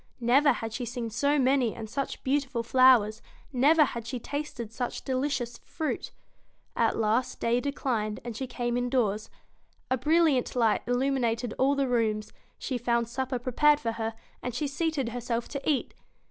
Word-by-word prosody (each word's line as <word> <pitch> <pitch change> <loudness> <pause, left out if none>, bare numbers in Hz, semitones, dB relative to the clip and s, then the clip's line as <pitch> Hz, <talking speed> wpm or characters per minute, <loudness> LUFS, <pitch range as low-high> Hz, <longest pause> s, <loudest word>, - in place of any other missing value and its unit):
Never 265 +5 +4
had 225 -1 -5
she 250 - -3
seen 240 -1 -4
so 285 +6 +2
many 260 -3 +2
and 225 -1 -6
such 275 +5 -4
beautiful 265 -3 0
flowers; 235 -4 +5 0.3
never 300 +5 +5
had 235 -4 -6
she 250 +2 -3
tasted 240 -5 -5
such 245 0 -4
delicious 260 -3 -2
fruit 315 -2 -4 0.6
At 230 -1 +2
last 225 +3 0
day 235 +1 +2
declined, 245 -6 -2
and 235 -2 -6
she 265 +3 -4
came 240 -1 -2
indoors. 240 -4 0 0.6
A 260 - +2
bril 320 +6 +4
liant 270 -7 +1
light 230 -3 +3
illumined 245 -2 0
all 275 +2 +3
the 275 -1 +1
rooms; 215 -3 0 0.2
she 255 -3 -3
found 235 -1 0
supper 260 +1 -2
prepared 290 +5 +3
for 230 - -1
her, 225 0 -3 0.3
and 250 -2 -4
she 300 - -1
seated 290 -3 -1
herself 235 0 -3
to 280 +1 -3
eat. 285 -4 0
245 Hz, 165 wpm, -28 LUFS, 230-275 Hz, 0.6 s, flowers